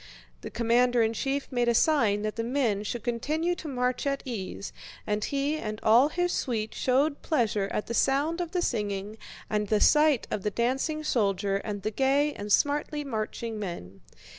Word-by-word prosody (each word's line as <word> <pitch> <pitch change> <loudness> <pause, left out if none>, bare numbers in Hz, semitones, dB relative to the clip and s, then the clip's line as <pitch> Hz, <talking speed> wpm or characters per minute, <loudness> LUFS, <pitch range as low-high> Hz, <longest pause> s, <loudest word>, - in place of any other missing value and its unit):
The - - -6
commander 240 +1 +2
in 225 0 +1
chief 275 +4 -2
made 245 -2 +1
a 235 - +3
sign 225 -8 +3
that 215 0 -2
the 230 - -2
men 235 -5 0
should 215 +2 -4
continue 305 +9 -1
to 350 - -7
march 250 0 -1
at 275 0 -1
ease, 205 -5 -5 0.3
and 210 0 -1
he 285 +2 -1
and 215 -6 -5
all 240 +6 +5
his 355 +2 0
suite 220 -8 -2
showed 280 +3 +1
pleasure 220 - 0
at 210 - -2
the 235 - -5
sound 290 +8 +1
of 345 - -3
the 355 0 -1
singing 210 - -2 0.3
and 210 -1 -1
the 215 +1 +2
sight 300 -2 +4
of 205 - -2
the 210 - 0
dancing 265 +8 -1
soldier 200 -7 +1
and 205 -1 -5
the 215 - -1
gay 275 +5 +2
and 205 0 -6
smartly 295 +4 +1
marching 225 -3 -4
men. 100 - -7
240 Hz, 185 wpm, -28 LUFS, 210-285 Hz, 0.3 s, all